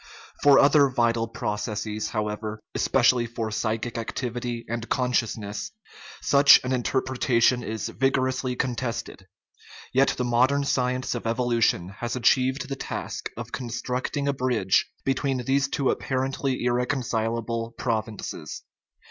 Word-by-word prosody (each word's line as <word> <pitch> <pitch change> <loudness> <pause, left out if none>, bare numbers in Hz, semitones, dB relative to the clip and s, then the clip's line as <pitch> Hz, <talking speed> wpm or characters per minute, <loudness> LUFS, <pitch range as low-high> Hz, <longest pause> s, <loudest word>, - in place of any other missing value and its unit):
For 140 -1 +7
other 140 0 +6
vital 115 -2 +1
processes, 105 -1 -3
however, 105 0 -3
especially 125 -2 +3
for 115 -1 -4
psychic 110 +2 -2
activity 120 0 -4
and 120 0 -4
consciousness, 115 -5 -1 0.5
such 140 0 +7
an 130 +1 -1
interpretation 125 -1 +1
is 110 -2 -4
vigorously 130 -1 0
contested. 115 -6 -3 0.7
Yet 135 +2 +3
the 125 - 0
modern 125 +4 +2
science 125 -1 0
of 120 -2 -4
evolution 115 -6 +1
has 120 0 -3
achieved 130 +2 +2
the 135 - -3
task - - -5
of 120 -1 -7
constructing 125 +3 -3
a 140 - +2
bridge 125 -8 +1 0.2
between 135 -1 0
these 135 +1 +2
two 140 -1 0
apparently 130 0 -2
irreconcilable 115 -2 -1
provinces. 110 -3 -4
120 Hz, 115 wpm, -25 LUFS, 115-130 Hz, 0.7 s, For